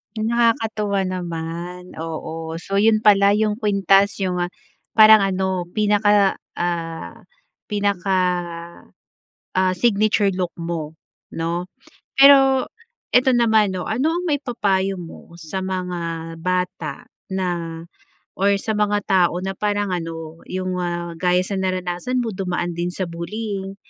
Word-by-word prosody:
Hmm, 215 0 -1
nakakatuwa 225 -3 +1
naman, 175 0 -5
oo. 160 0 -5
So, 195 - -5
'yon 215 +2 +4
pala 200 -2 +5
yung 210 0 +1
kwintas, 200 -2 +2
yung 180 -2 0 0.5
parang 215 -2 +8
ano, 190 -1 0
pinaka, 205 -1 +3 0.2
ah, 170 -2 -4 0.6
pinaka, 200 -2 0 1.4
ah, 185 0 +3
signature 210 0 +2
look 180 -2 -2
mo, 165 -2 -5 0.4
'no? 170 +2 -2 0.5
Pero 270 -1 +7 0.5
ito 255 +1 +5
naman, 220 -4 +4
'no, 180 - -4
ano 260 +8 0
ang 350 +2 -2
maipapayo 205 - 0
mo 170 0 -11
sa 175 +3 -5
mga 175 -3 -4
bata 185 +6 -2 0.2
na, 170 -3 -3 0.5
or 200 +1 +3
sa 220 -3 -2
mga 210 0 +1
tao 180 -3 +3
na 190 +1 -4
parang 205 0 -1
ano, 165 -2 -5
yung, 185 0 -3
ah, 175 -1 -3
gaya 180 +1 +2
sa 195 +1 -3
naranasan 185 +5 -1
mo, 230 -2 -2
dumaan 180 -2 -2
din 175 +1 -1
sa 185 - -3
bullying, 195 +3 -5
190 Hz, 125 wpm, -21 LUFS, 175-210 Hz, 1.4 s, parang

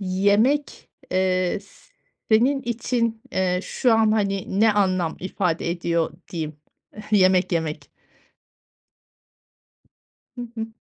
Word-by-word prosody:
yemek, 205 +9 +1 0.2
eee, 185 +1 +1
s 200 - -22 0.4
senin 260 +5 +3
için, 230 -1 -1
eee, 180 -1 +1
şu 245 -3 +1
an, 220 -1 +3
hani, 195 -2 -1
ne 220 -1 +5
anlam 185 -5 +1
ifade 180 -3 -1
ediyor 170 -1 -1 0.2
diyeyim, 155 -3 -4 0.6
yemek 185 -2 +4
yemek? 155 -3 -2 2.5
Hı - - -4 0.2
hı. 225 0 -3
195 Hz, 100 wpm, -23 LUFS, 180-220 Hz, 2.5 s, ne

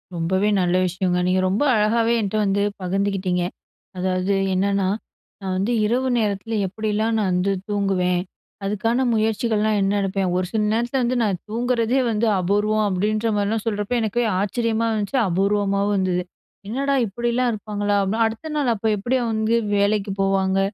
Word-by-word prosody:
ரொம்பவே 190 +5 +1
நல்ல 180 0 +1
விஷயங்க. 180 0 -1
நீங்க 185 +1 +2
ரொம்ப 200 +9 +1
அழகாவே 225 +2 +2
என்ட்ட 205 +1 -2
வந்து 200 0 +1 0.2
பகிர்ந்துகிட்டிங்க. 190 -1 -1 0.5
அதாவது 185 +1 0 0.2
என்னன்னா, 195 0 +1 0.5
"நான் 190 -1 -2
வந்து 200 +6 0
இரவு 250 +4 +1
நேரத்துல 215 +1 -1
எப்டிலாம் 215 +3 -1
நான் 195 -3 0
வந்து 180 +2 +1 0.2
தூங்குவேன்? 185 -3 +1 0.4
அதுக்கான 225 +5 0
முயற்சிகள்லாம் 220 -1 +1
என்ன 195 +1 +1
எடுப்பேன்? 195 -1 -1
ஒரு 185 - 0
சில 220 -1 0
நேரத்துல 240 +3 0
வந்து 245 +1 0
நான் 195 -5 -1
தூங்றதே 240 +2 +1
வந்து 220 +2 +1
அபூர்வம்." 210 +3 +1
அப்டின்ற 215 +4 0
மாரிலாம் 210 +2 -1
சொல்றப்போ 210 +2 -1
எனக்கே 225 +2 0 0.2
ஆச்சரியமா 230 +2 0
இருந்துச்சு. 215 +4 -1
அபூர்வமாவும் 200 +2 +1
இருந்துது. 180 -1 0 0.4
என்னடா 275 +6 -1
இப்டிலாம் 240 +4 0
இருப்பாங்களா? 205 -1 -2
அப்டின்னு. 220 +4 +1
"அடுத்த 225 +8 -4
நாள் 285 -4 +1
அப்ப 220 +1 -1
அப்டியே 245 +5 0
வந்து 220 +1 +1 0.2
வேலைக்கு 200 0 +1
போவாங்க? 195 0 +1
205 Hz, 145 wpm, -22 LUFS, 195-225 Hz, 0.5 s, நீங்க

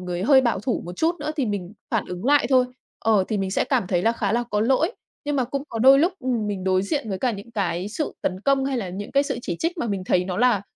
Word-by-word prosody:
người 180 0 -4
hơi 265 +3 +6
bảo 235 -6 0
thủ 250 +2 -2
một 175 +1 -8
chút 330 +2 +1
nữa 305 - -2
thì 270 -5 0
mình 200 -2 -4 0.2
phản - - 0
ứng 180 +4 -6
lại 290 +2 +4
thôi, 255 -1 +5 0.3
ờ, 215 -4 +3
thì 215 - -1
mình 190 -1 -2
sẽ - - +1
cảm 185 - 0
thấy 180 -1 0
là 230 - +3
khá 215 -3 -1
là 240 +1 +1
có 210 0 +1
lỗi. 270 - +2 0.3
Nhưng 290 -1 -1
mà 255 - +2
cũng 275 +3 -3
có 230 - -5
đôi 270 +3 +7
lúc, 345 +5 +3
ừm, 245 -6 -1
mình 195 -2 -3
đối 185 0 +2
diện 250 +2 -2
với 190 -2 -3
cả 255 - +1
những 205 +3 -9
cái 190 -3 -2
sự 300 +7 -3
tấn 185 +1 -2
công 275 +2 +2
hay 270 -1 -1
là 190 -5 -3
những 200 +5 -7
cái 280 0 +4
sự - - -3
chỉ 175 - -3
trích 340 +1 -2
mà 235 - -1
mình 200 -3 -2
thấy 180 0 +2
nó 180 -1 -4
là 235 -4 +3
225 Hz, 295 wpm, -23 LUFS, 190-270 Hz, 0.3 s, đôi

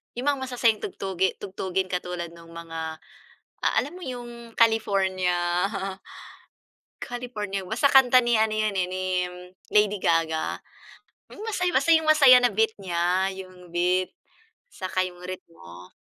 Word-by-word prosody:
yung 245 +2 -4
mga 280 - -3
masasayang 235 -4 +2
tugtugi 190 -1 -2
tugtugin 190 -1 -3
katulad 180 -2 -4
nung 170 0 -15
mga 165 -1 -6 0.8
alam 290 +5 0
mo 365 - -11
yung 240 -4 -8
California, 195 -5 +2 1.8
California 225 -5 -4
basta 245 +7 +2
kanta 255 -2 +6
ni 240 -2 +3
ano 220 0 +2
yun, 215 -1 +1
eh, 180 - +1
ni 185 0 -4 0.6
Lady 210 -1 +2
Gaga 165 -2 +1 0.8
yung 415 - -10
masayang 335 -6 +2
masaya 280 -5 +8
na 245 -1 +2
beat 220 +2 +2
niya 180 0 0
yung 185 -2 -11
beat 180 +1 +1 0.6
'saka 185 0 -1
yung 180 -1 -12
ritmo. 90 - -10
195 Hz, 125 wpm, -25 LUFS, 180-245 Hz, 1.8 s, masaya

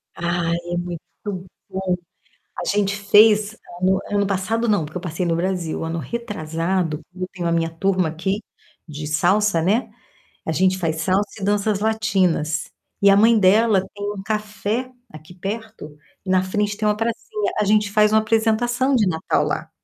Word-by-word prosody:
Ai, 170 0 0 0.2
é - - 0
muito 175 -2 -4 0.7
bom. 190 -1 -1 0.6
A - - -3
gente 200 0 +1
fez 210 +1 +4 0.2
ano 190 +1 +3
ano 205 -1 +1
passado 225 +4 -1
não, 205 -7 +2
porque 155 +4 -6
eu - - -7
passei 175 +1 -3
no 165 -1 +1
Brasil, 175 -2 -2
ano 165 +1 -3
retrasado, 165 - -2 0.2
eu 185 0 -4
tenho 175 -2 -3
a - - +1
minha 165 -1 +1
turma 185 0 0
aqui 190 +6 -2 0.5
de 150 0 -6
salsa, 175 +3 +2
né, 210 +9 +1 0.6
a 160 - -1
gente 185 +3 +2
faz 160 -3 -1
salsa 190 +4 +1
e - - -5
danças 205 0 +1
latinas. 190 -8 +1 0.4
E 200 - +6
a 195 - +6
mãe 225 +2 +6
dela 205 +1 +4
tem 205 0 -3
um 195 -1 -7
café 215 +3 -2 0.2
aqui 155 +3 -12
perto, 205 -5 -6 0.3
na 185 0 +3
frente 205 +2 -1
tem 215 -1 0
uma 210 - +3
pracinha. 235 - -2
A 210 - +2
gente 210 0 +2
faz 210 0 +4
uma 220 - +6
apresentação 235 +4 +1
de 215 -4 +3
Natal 160 -2 0
lá, - - -3
195 Hz, 170 wpm, -22 LUFS, 170-215 Hz, 0.7 s, E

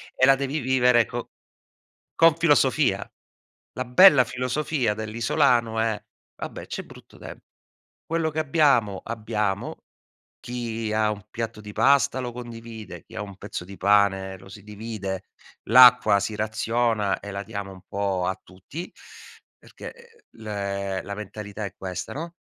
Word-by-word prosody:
e 130 - +4
la 135 0 +6
devi 140 +3 -2
vivere 125 -2 +3
co 120 0 -6 0.9
con 165 -1 +6
filosofia. 145 -9 +2 0.6
La 130 - -3
bella 140 +1 +7
filosofia 125 -1 -1
dell'isolano 115 +1 +1
è: 110 -2 0 0.4
"Vabbè - - -7
c'è - - -5
brutto - - -16
tem - - -9 0.7
quello 165 -1 0
che 155 - -6
abbiamo, 135 - +2
abbiamo", 105 -3 -3 0.6
chi 115 -3 -4
ha 110 0 +2
un 105 0 -9
piatto 115 -2 -5
di 105 - -9
pasta 130 +4 +3
lo 120 -1 -4
condivide, 115 -2 -9
chi - - -17
ha 105 - -3
un 100 -2 -9
pezzo 100 -3 -6
di 100 +2 -11
pane 95 -1 +2
lo 95 - -15
si 100 +1 -12
divide, 105 -3 -6 0.4
l'acqua 125 -3 +8
si 110 - -3
raziona 110 -1 0
e 100 - -8
la 100 +1 -5
diamo 100 -3 -6
un 95 -1 -14
po' 100 -2 -1
a 95 0 -2
tutti, 95 - -9 0.7
perché, - - -11
ehm, 475 -1 -20 0.2
l 100 -2 -3
la 100 - -5
mentalità 105 0 -7
è 100 -1 -6
questa, 90 -1 -5
no, 165 +3 -6
110 Hz, 145 wpm, -25 LUFS, 100-125 Hz, 0.9 s, l'acqua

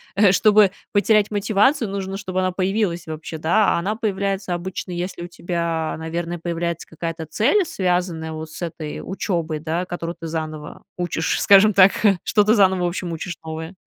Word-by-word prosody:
э, 200 -2 +5
чтобы 210 0 +5 0.2
потерять 210 0 +3
мотивацию, 210 +4 +2
нужно, 195 -1 -4
чтобы 185 -2 -3
она 185 0 +1
появилась 185 -1 -1
вообще, 160 0 -6
да. 185 +6 +2
А - - 0
она 200 +5 -2
появляется 195 -3 -2
обычно, 180 +1 -5
если 175 0 -4
у - - -6
тебя, 170 -2 -2
наверное, 170 +1 -4
появляется 170 0 -3
какая-то 165 0 -5
цель, 290 - +2
связанная 180 - -1
вот 155 0 -6
с 175 - -8
этой 155 -2 -5
учебой, 170 -5 -2
да, 165 +3 -2
которую 175 -1 -5
ты 165 - -7
заново 155 -2 -5 0.2
учишь, 175 -2 -1
скажем 200 +2 +6
так, 190 0 +7 0.3
что 210 - +3
ты 215 +3 +4
заново, 190 -3 +3
в - - +2
общем, 175 0 -4
учишь 175 +2 -5
новое. 160 +3 -6
180 Hz, 175 wpm, -22 LUFS, 165-200 Hz, 0.3 s, так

